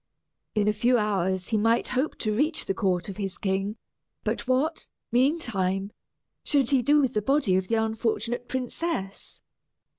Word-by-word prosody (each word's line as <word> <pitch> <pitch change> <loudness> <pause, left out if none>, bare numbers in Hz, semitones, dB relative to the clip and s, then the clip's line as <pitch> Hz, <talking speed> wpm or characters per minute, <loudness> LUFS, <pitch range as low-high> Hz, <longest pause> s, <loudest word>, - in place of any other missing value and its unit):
In 210 -1 +2
a 210 - +3
few 240 +4 +3
hours 190 -4 0
he 220 -2 +2
might 230 +2 +2
hope 265 +5 -1
to 215 -2 -1
reach 305 +6 0
the - - 0
court 190 -2 0
of 195 - -7
his 195 -3 -3
king; 195 +2 -1 0.5
but - - -2
what, 275 +6 0 0.2
meantime, 215 - +1 0.5
should 275 -4 +2
he 270 -2 +4
do 290 +5 +4
with 265 -4 +1
the 210 - +1
body 270 -5 +2
of 185 0 0
the 230 - +1
unfortunate 225 +2 -1
princess? 255 - -4
220 Hz, 160 wpm, -26 LUFS, 195-255 Hz, 0.5 s, he